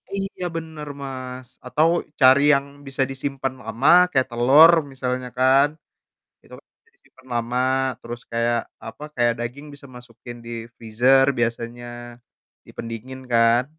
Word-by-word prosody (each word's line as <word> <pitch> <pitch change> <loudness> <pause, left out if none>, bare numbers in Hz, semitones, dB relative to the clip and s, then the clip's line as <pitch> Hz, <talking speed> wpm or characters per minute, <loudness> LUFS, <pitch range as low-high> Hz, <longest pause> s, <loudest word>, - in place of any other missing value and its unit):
Iya 195 -2 -5
bener, 160 -2 -7
Mas. 130 -2 -7 0.2
Atau 150 +5 +2 0.3
cari 130 +2 +6
yang 140 0 +1 0.2
bisa 135 0 -1
disimpan 135 0 -4
lama 115 +6 0 0.2
kayak 130 -4 +1
telur 135 +8 +7 0.2
misalnya 125 -1 -4
kan. 135 +2 +4 0.8
Itu - - -14
kan - - -67 0.2
bisa - - -30
disimpan 130 - -24
lama. 120 +1 -2 0.4
Terus 120 +1 -8
kayak, 115 0 +1 0.3
apa? 115 +6 -10
Kayak 120 -1 +2
daging 125 +5 -6
bisa 140 0 -14
masukin 120 0 -12
di 115 - -9 0.3
freezer 125 +4 +3
biasanya 120 +1 -3 0.8
di - - -14
pendingin 115 +3 -7
kan. 115 +1 +4
130 Hz, 135 wpm, -22 LUFS, 120-135 Hz, 0.8 s, telur